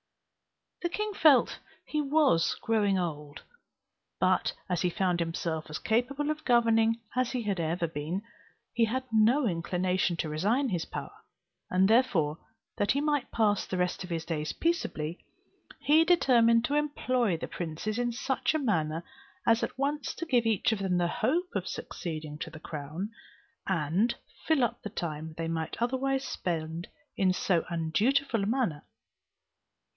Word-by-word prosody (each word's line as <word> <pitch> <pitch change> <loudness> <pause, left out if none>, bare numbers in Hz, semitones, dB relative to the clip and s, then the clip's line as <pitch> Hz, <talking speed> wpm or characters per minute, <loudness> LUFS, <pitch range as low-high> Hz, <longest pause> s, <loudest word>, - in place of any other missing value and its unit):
The 345 - 0
king 425 +3 -2
felt 305 -8 +5 0.3
he 305 - -1
was 285 - +3
growing 210 -4 +2
old; 150 -5 -4 0.8
but - - +2 0.2
as 180 -2 -1
he 180 - +2
found 180 0 0
himself 165 -1 -2
as 155 - -4
capable 270 +6 0
of 305 0 -5
governing 230 -2 +3 0.2
as 255 0 +1
he 250 -2 -1
had 200 -4 -1
ever 170 +1 0
been, 165 +5 -4 0.5
he 230 -1 +3
had 260 +4 -2
no 230 +6 +4
inclination 180 0 0
to 160 - -1
resign 215 - +1
his 175 -5 -1
power; - - -6 0.6
and 185 +1 +4
therefore, 195 - +3 0.4
that 205 - +2
he 280 - +1
might 295 -2 0
pass 210 -3 +1
the 185 - -3
rest 180 +1 -1
of 180 - -8
his 165 -2 -3
days 155 -2 -2
peaceably, 175 - -2 0.6
he 310 +3 +5
determined 240 -9 +4
to 280 - -2
employ 255 - +1
the - - -5
princes 175 +7 -4
in 240 0 0
such 265 +5 -1
a - - +2
manner, 165 - 0 0.4
as 230 0 +4
at - - -3
once 285 +2 -1
to 335 - -4
give 245 -7 +2
each 220 -1 +2
of 220 - -1
them 190 -2 0
the 175 -1 +2
hope 345 - 0
of - - -2
succeeding 155 -3 -5
to - - -4
the 160 -1 -11
crown, 155 +7 -5 0.6
and 185 +6 +1 0.3
fill 315 -5 +3
up 235 - -1
the 210 - -5
time 160 -5 -5
they 165 0 -2
might 160 -1 -3
otherwise 265 +3 0
spend 165 0 -3 0.3
in 190 -2 +3
so 180 -2 +1
undutiful 215 +10 +1
a 200 - -1
manner. 225 - 0
205 Hz, 160 wpm, -29 LUFS, 165-255 Hz, 0.8 s, felt